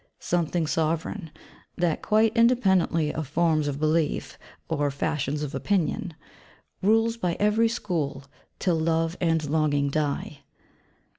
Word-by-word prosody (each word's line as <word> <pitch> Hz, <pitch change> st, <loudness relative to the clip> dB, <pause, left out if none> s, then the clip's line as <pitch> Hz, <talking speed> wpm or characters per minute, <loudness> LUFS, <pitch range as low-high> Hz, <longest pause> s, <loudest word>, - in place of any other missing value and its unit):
' -, -, -48 dB
Something 170 Hz, -1 st, +1 dB
sovereign, 160 Hz, +3 st, -1 dB, 0.5 s
that, 175 Hz, -3 st, 0 dB
quite 220 Hz, +1 st, +2 dB
independently 190 Hz, -10 st, +3 dB
of 155 Hz, -2 st, -4 dB
forms 155 Hz, 0 st, +1 dB
of 140 Hz, -1 st, -3 dB
belief, 155 Hz, 0 st, 0 dB, 0.3 s
or 145 Hz, -2 st, 0 dB
fashions 145 Hz, +1 st, -2 dB
of 145 Hz, 0 st, -5 dB
opinion, 185 Hz, -1 st, -1 dB, 0.7 s
'rules 225 Hz, +3 st, +3 dB
by 180 Hz, -6 st, -1 dB
every 215 Hz, +2 st, +3 dB
school, 160 Hz, -, -3 dB, 0.3 s
till 175 Hz, -4 st, +1 dB
love 165 Hz, +1 st, 0 dB
and 165 Hz, -3 st, +1 dB
longing 145 Hz, -2 st, +1 dB
die.' 145 Hz, -1 st, -2 dB
165 Hz, 125 wpm, -26 LUFS, 150-190 Hz, 0.7 s, independently